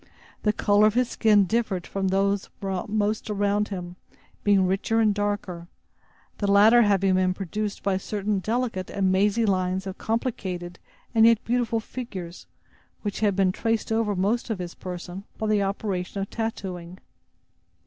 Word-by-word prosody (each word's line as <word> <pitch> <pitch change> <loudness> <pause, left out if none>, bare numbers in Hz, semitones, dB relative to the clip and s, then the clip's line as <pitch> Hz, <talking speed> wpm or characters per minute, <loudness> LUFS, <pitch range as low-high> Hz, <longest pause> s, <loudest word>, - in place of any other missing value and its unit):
The 210 - +2
color 205 0 +4
of 215 - 0
his 250 -1 +2
skin 210 -3 +4
differed 200 -3 -1
from 195 -1 -2
that 190 +1 +1 0.5
of 190 0 -3
most 215 +1 -1
around 205 0 +1
him, 180 -2 -6 0.5
being 200 -2 +4
richer 195 +5 +1
and 215 -2 +4
darker, 205 -4 -3 0.7
the 200 -1 +1
latter 215 +4 +7
having 195 -3 +3
been 185 0 +2
produced 205 +2 -4
by 195 -1 +1
certain 205 +1 -2
delicate 220 -2 -2
and 190 -2 +1
mazy 205 +4 +2
lines 185 -1 0
of 190 0 -6
complicated 190 -7 -3 0.3
and 225 -1 +6
yet 230 -1 +4
beautiful 235 -1 +1
figures, 195 -7 -7 0.6
which 205 -2 -3
had 205 -3 +2
been 190 -1 +3
traced 225 +3 -1
over 220 -2 +1
most 210 +7 0
of 220 - -1
his 175 -1 -6
person 180 +1 -7
by 220 - -3
the 215 -1 +2
operation 195 -1 -2
of 195 - -4
tattooing. 185 -6 -4
200 Hz, 160 wpm, -25 LUFS, 185-220 Hz, 0.7 s, latter